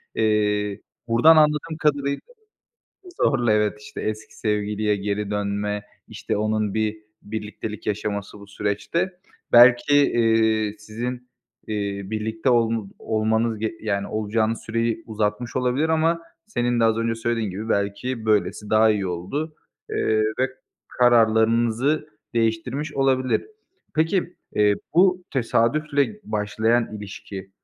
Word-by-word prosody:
Eee, 105 -2 +1 0.3
buradan 120 +8 +6
anladığım 155 +1 +2
kadarıyla 140 -2 +1 1.0
zorla, 120 -5 +3
evet, 105 0 +1
işte, 105 - -8
eski 110 0 -5
sevgiliye 105 -1 0
geri 100 +1 -2
dönme, 105 0 -2 0.3
işte, - - -3
onun 110 -1 0
bir 110 0 0 0.3
birliktelik 105 0 -6
yaşaması 105 -1 -3
bu 100 - -12
süreçte. 105 - -2 0.3
Belki, 120 +3 +7
eee, 110 -5 +3
sizin, 120 +4 -6 0.4
eee, 100 -2 -3
birlikte 110 +4 -1
ol 115 -3 +1
olmanız 110 +1 0
ge 110 +1 -2
yani, 100 -2 -1
olacağınız 110 +1 -1
süreyi 115 0 -1
uzatmış 110 +2 -2
olabilir 130 +5 +1
ama 165 +1 +2 0.3
senin 120 - 0
de - - +4
az 110 -1 +3
önce 115 0 0
söylediğin 115 -2 -1
gibi 105 +5 -6
belki 110 +4 -1
böylesi 105 -1 +1
daha 110 +1 +5
iyi 100 -3 0
oldu. 100 - -4 0.4
Eee, 110 0 +1 0.2
ve 130 +1 +2 0.4
kararlarınızı 120 +4 +3 0.3
değiştirmiş 115 +6 -1
olabilir. 130 -2 +2 0.5
Peki, 170 +3 0 0.2
eee, 105 -1 +4 0.2
bu 180 0 +4
tesadüfle 145 - +1
başlayan 110 +2 0
ilişki 100 -1 -8
110 Hz, 115 wpm, -23 LUFS, 105-125 Hz, 1.0 s, Belki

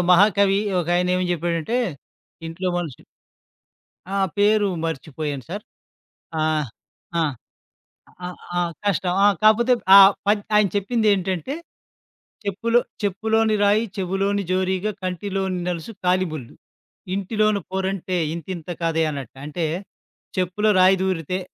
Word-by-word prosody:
మహాకవి 200 +1 +5 0.2
ఒకాయన 175 +1 +1
ఏమని 180 0 0
జెప్పాడంటే 170 +5 -1 0.7
ఇంట్లో 180 +3 -3
మనిషి 160 -7 -6 1.1
ఆ! - - 0 0.2
పేరు 205 0 +4 0.2
మర్చిపోయాను 145 -2 -4
సార్. 205 +3 -5 0.8
ఆహ్, 155 -3 0 0.5
ఆ! - - +3 1.0
ఆహ్, 180 - -7 0.2
ఆ! - - +3 0.2
కష్టం 185 -2 +1
ఆ! - - +7 0.2
కాకపోతే 235 +4 +5 0.2
ఆ - - +12 0.3
పద్ 205 0 +2
ఆయన 210 -1 +5
చెప్పిందేంటంటే, 200 - 0 0.9
చెప్పులు 230 +5 +1 0.2
చెప్పులోని 220 +3 +1
రాయి 210 +3 +3
చెవులోని 195 +2 0
జోరీగా 190 +2 0
కంటిలోని 190 0 -2
నలుసు 175 +4 -4
కాలిముల్లు. 175 -8 -1 0.6
ఇంటిలోన 210 +1 +1
పోరంటే 190 -1 -2 0.2
ఇంతింత 170 0 -7
కాదే 165 -1 +1
అన్నట్టు. 140 -2 -7
అంటే 160 +3 -3 0.7
చెప్పులో 185 +4 +1
రాయి 185 +1 +6
దూరితే 185 -1 -1
190 Hz, 105 wpm, -22 LUFS, 175-205 Hz, 1.1 s, ఆ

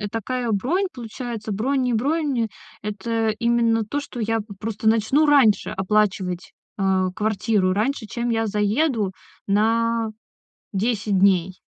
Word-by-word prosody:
э, 205 - -3
такая 240 +2 -2
бронь, 295 - +1
получается. 230 -2 -6
Бронь 260 +7 0
не 250 -2 +1
бронь. 275 -2 0 0.3
Это 220 +2 -1
именно 235 -2 +2
то, 285 +7 -2
что 280 -4 -9
я 225 +1 0
п 205 -1 -9
просто 220 0 -1
начну 225 +7 +3
раньше 275 -8 +4
оплачивать, 190 -2 0 0.2
а, 190 -2 +1
квартиру, 210 -2 +1
раньше, 220 +3 -1
чем 240 +2 -3
я 225 -1 +1
заеду 210 +1 +1 0.3
на 225 +2 +2 0.6
10 210 -1 0
дней. 185 -2 +3
225 Hz, 135 wpm, -23 LUFS, 205-240 Hz, 0.6 s, раньше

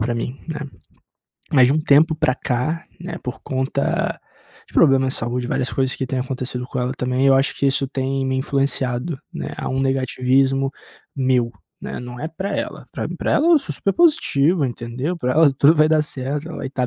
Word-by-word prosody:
pra 120 +2 0
mim, 125 +3 -4
né. 160 - -3 0.9
Mas 130 -3 +6
de - - +3
um 155 - +2
tempo 155 +2 +4
para 130 -4 +2
cá, 140 +6 -2 0.2
né, 175 0 -6
por 125 0 -6
conta 135 +1 -1 0.5
de - - -21
problemas 135 -4 +4
de - - -3
saúde, 120 +2 -2
várias 125 0 -1
coisas 130 -1 0
que - - -3
têm 130 - -2
acontecido 125 -1 -4
com 130 - -5
ela 125 0 -1
também, 125 +1 0
eu 135 - +6
acho 135 +1 +2
que - - -2
isso 135 0 +1
tem 135 0 -2
me 130 - -1
influenciado, 135 +1 -1 0.2
né, - - -5
a - - -4
um 130 +1 -1
negativismo 135 +1 +1 0.4
meu, 130 -3 +1 0.3
né. - - -6
Não 125 0 -8
é 155 - -3
pra 190 +5 -4
ela, - - -4
pra - - -3
pra - - -2
ela 315 - +3
eu 335 - +7
sou - - -5
super 195 - 0
positivo, 175 - +3
entendeu, 125 +6 -3
pra 125 -6 -1
ela 155 -3 +5
tudo 140 +4 +5
vai 155 0 +5
dar 155 -1 +3
certo, 145 +2 -4
ela 160 - -7
vai - - -4
estar 130 -2 -2
135 Hz, 205 wpm, -21 LUFS, 125-150 Hz, 0.9 s, eu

